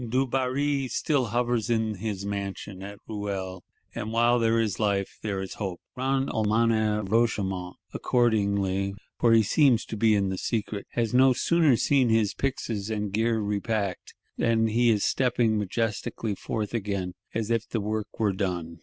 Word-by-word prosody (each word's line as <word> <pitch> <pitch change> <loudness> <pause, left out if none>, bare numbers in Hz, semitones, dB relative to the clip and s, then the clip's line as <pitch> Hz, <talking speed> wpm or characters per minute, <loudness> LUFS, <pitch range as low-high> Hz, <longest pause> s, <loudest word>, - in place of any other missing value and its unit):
Dubarry 135 +2 0
still 130 +2 0
hovers 120 0 0
in 110 -2 +1
his 100 -1 -4
mansion 100 -1 -5
at 100 +1 -8
Ruel; 95 -4 -4 0.3
and 110 - -4
while 120 +1 +3
there 115 0 +2
is 110 -5 -1
life, 100 -2 -1
there 100 -3 -2
is 95 - -6
hope. 95 -4 -3
Grand 135 +1 0
Almoner 110 0 +1
Roche 115 +4 +2
Aymon, 95 -3 -3 0.2
accordingly 100 -5 +1 0.2
(for 120 - +4
he 115 -1 +6
seems 130 +2 +3
to - - -6
be 110 0 +3
in 100 -2 +1
the 95 - -3
secret), 105 -3 -3
has 115 -2 0
no 130 +1 +6
sooner 160 0 +3
seen 130 +1 +3
his 110 -2 +2
pyxes 115 -6 -3
and 105 -2 -2
gear 115 +2 +1
repacked, 105 -2 -2 0.2
then 115 -1 +2
he 120 +2 +3
is 105 -3 +2
stepping 120 -4 +2
majestically 105 +1 -2
forth 105 +2 -4
again, 100 -5 -2 0.2
as 115 0 -1
if 115 -1 0
the 115 - -1
work 105 +1 -2
were 105 -3 +2
done! 90 -4 -3
110 Hz, 165 wpm, -27 LUFS, 100-120 Hz, 0.3 s, he